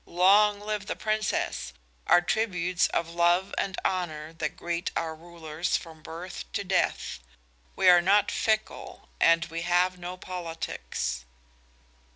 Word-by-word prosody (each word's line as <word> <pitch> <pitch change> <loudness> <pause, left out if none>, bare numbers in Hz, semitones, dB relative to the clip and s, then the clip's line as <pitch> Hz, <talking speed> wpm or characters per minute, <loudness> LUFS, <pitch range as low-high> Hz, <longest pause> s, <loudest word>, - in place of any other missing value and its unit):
'Long 205 +4 +5
live 210 0 -4
the - - -2
Princess!' 215 - -1 0.3
are 175 - +6
tributes 180 -3 +1
of 165 0 -2
love 175 +2 +2
and 190 -1 -2
honor 160 -4 -2
that 155 -3 -4
greet 170 0 -2
our 160 -1 -1
rulers 165 0 -3
from 160 -2 -11
birth 170 +4 -7
to 200 - -1
death. 185 - 0 0.6
We - - +2
are 175 -1 +8
not 200 +3 +3
fickle, 220 -1 -2
and 165 -1 +4
we 165 +1 -5
have 180 +1 +2
no 180 +1 -6
politics." 165 - -4
175 Hz, 135 wpm, -27 LUFS, 165-190 Hz, 0.6 s, are